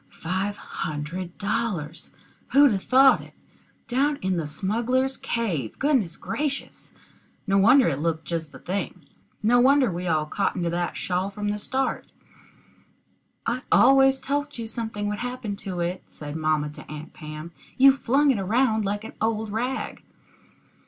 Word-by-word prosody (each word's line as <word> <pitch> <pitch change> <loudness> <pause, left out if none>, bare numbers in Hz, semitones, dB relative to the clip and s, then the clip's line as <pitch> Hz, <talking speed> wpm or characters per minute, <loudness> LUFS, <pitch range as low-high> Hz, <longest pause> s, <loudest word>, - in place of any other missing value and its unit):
Five 190 +4 -3
hundred 165 +4 -5
dollars! 200 -7 -2 0.4
who'd 280 -1 +7
'a 195 - 0
thought 265 +6 +5
it? - - -15 0.5
Down 280 +4 +1
in 190 0 +1
the 160 -3 -2
smugglers' 235 - 0
cave! 180 - -2
Goodness 255 - +1
gracious! 290 -2 -4 0.5
No 195 -2 +3
wonder 250 +7 +6
it 140 -4 0
looked 160 0 -1
just 165 -3 -3
the - - -11
thing. 185 -4 -4 0.4
No 240 +3 +5
wonder 265 -2 +4
we 180 +1 -4
all 155 -2 +1
cottoned 180 +2 -1
to 170 - 0
that 175 0 -2
shawl 185 +1 -1
from 205 +1 -4
the 210 0 -2
start. 265 +5 -2 1.4
"I 240 +2 -1
always 270 0 +6
told 290 +1 -2
you 230 -1 -5
something 220 -2 -4
would 210 0 -3
happen 245 -4 -4
to 185 -3 -4
it," 175 +2 -2
said 150 0 -8
mamma 155 -2 0
to 150 - -11
Aunt 150 +1 -8
Pam. 155 +2 -8 0.3
"You 270 +1 +7
flung 275 +2 +3
it 235 - 0
around 220 +3 +2
like 205 +1 -2
an - - -8
old 220 -1 0
rag." 250 +5 -3
205 Hz, 155 wpm, -25 LUFS, 170-255 Hz, 1.4 s, who'd